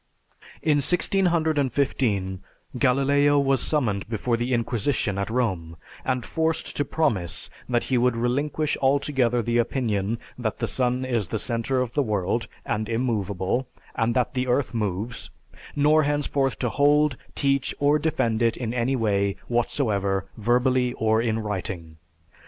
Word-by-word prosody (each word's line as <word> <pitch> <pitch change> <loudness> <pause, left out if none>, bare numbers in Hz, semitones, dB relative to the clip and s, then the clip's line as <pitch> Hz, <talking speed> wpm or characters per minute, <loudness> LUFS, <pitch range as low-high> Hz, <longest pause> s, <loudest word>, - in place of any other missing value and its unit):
In 150 -2 +3
1615, 145 - +1 0.4
Galileo 140 +2 +3
was 135 -2 +2
summoned 110 -10 0
before 115 +1 0
the 120 +2 -2
Inquisition 115 -3 0
at 100 - -2
Rome, 95 -9 -1 0.3
and 130 -2 -1
forced 160 0 -1
to 145 - +2
promise 115 - -1 0.2
that 120 -1 +1
he 130 -2 +1
would 125 -1 +2
"relinquish 145 +6 0
altogether 130 -3 +2
the 120 +2 +1
opinion 115 -4 0 0.2
that 110 -3 -2
the - - -1
sun 125 0 0
is 115 -7 -1
the 110 - -2
center 120 +4 -1
of 125 -2 -3
the 145 - +2
world, 105 -1 -1 0.2
and 110 +1 -2
immovable, 115 -1 -1 0.3
and 115 +1 0
that 125 +1 +1
the 130 -1 -1
earth 125 +1 +1
moves, 105 +1 -3 0.5
nor 150 +2 +4
henceforth 140 -2 0
to 125 - -1
hold, 145 +2 +3 0.2
teach, 140 -2 +1
or 145 +1 +3
defend 120 -7 0
it 115 -1 +2
in 120 -2 -3
any 125 +2 0
way 100 -4 +1
whatsoever 100 -6 0
verbally 125 +2 +2
or 110 0 +2
in 115 -2 0
writing." 90 -6 -4
120 Hz, 140 wpm, -25 LUFS, 110-140 Hz, 0.5 s, nor